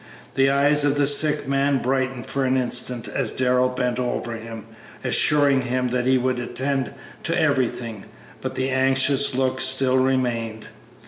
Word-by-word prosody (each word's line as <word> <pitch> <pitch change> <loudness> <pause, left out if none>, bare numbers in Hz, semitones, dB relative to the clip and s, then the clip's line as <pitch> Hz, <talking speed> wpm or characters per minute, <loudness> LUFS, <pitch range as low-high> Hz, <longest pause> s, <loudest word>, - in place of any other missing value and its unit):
The 135 +1 +3
eyes 145 +2 +3
of 145 -1 +2
the 145 -1 +2
sick 145 0 +3
man 140 0 +1
brightened 130 -1 -2
for 140 - -2
an 130 0 +1
instant 125 -1 0
as - - -2
Darrell 125 0 +1
bent 125 -1 -2
over 120 -1 -3
him, 115 -1 -9 0.4
assuring 145 -3 +3
him 125 0 -2
that 125 0 -1
he 130 0 +4
would 130 0 -1
attend 135 +2 -2 0.3
to 170 +1 -1
everything, 125 -8 -1 0.4
but - - -5
the 130 0 -1
anxious 135 +1 +2
look 130 0 0
still 130 0 +2
remained. 120 -4 -1
130 Hz, 155 wpm, -22 LUFS, 125-140 Hz, 0.4 s, he